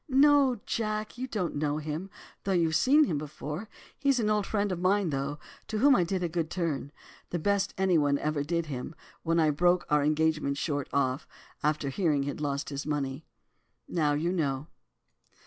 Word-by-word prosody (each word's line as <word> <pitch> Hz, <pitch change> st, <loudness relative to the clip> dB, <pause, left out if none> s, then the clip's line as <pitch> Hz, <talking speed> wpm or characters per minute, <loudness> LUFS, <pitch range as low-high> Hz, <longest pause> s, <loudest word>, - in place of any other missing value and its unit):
'No, 275 Hz, -2 st, +5 dB
Jack, 215 Hz, +1 st, -2 dB
you 260 Hz, -, -2 dB
don't 205 Hz, -8 st, -2 dB
know 145 Hz, 0 st, 0 dB
him, 155 Hz, +5 st, -4 dB, 0.3 s
though 195 Hz, -, 0 dB
you've 165 Hz, -3 st, +2 dB
seen 290 Hz, -, +5 dB
him 160 Hz, -, 0 dB
before. 150 Hz, +6 st, -6 dB, 0.3 s
He's 275 Hz, -3 st, +2 dB
an 215 Hz, -2 st, +1 dB
old 210 Hz, -2 st, +1 dB
friend 205 Hz, -2 st, 0 dB
of 180 Hz, -, -2 dB
mine, 185 Hz, -1 st, +2 dB
though, 140 Hz, +1 st, -2 dB, 0.3 s
to 220 Hz, -, -2 dB
whom 275 Hz, +4 st, +6 dB
I 180 Hz, -, +3 dB
did 180 Hz, +1 st, -2 dB
a -, -, +1 dB
good 165 Hz, -1 st, -2 dB
turn, 160 Hz, -6 st, -2 dB, 0.4 s
the 175 Hz, -, -2 dB
best 200 Hz, +3 st, 0 dB
any 185 Hz, -3 st, +3 dB
one 145 Hz, -1 st, +2 dB
ever 150 Hz, 0 st, -1 dB
did 170 Hz, +2 st, -1 dB
him, 140 Hz, +1 st, -6 dB, 0.3 s
when 165 Hz, 0 st, +1 dB
I 155 Hz, -2 st, +4 dB
broke 175 Hz, +4 st, +2 dB
our 150 Hz, -1 st, +4 dB
engagement 155 Hz, -1 st, +1 dB
short 145 Hz, -3 st, -2 dB
off, 130 Hz, -1 st, 0 dB, 0.3 s
after 150 Hz, -2 st, 0 dB
hearing 150 Hz, -2 st, +1 dB
he'd 145 Hz, +1 st, -4 dB
lost 140 Hz, -1 st, -2 dB
his 140 Hz, 0 st, -5 dB
money. 145 Hz, 0 st, -3 dB, 0.6 s
Now 150 Hz, -4 st, +1 dB
you 160 Hz, +4 st, 0 dB
know. 145 Hz, -6 st, -1 dB
160 Hz, 185 wpm, -29 LUFS, 145-195 Hz, 0.6 s, whom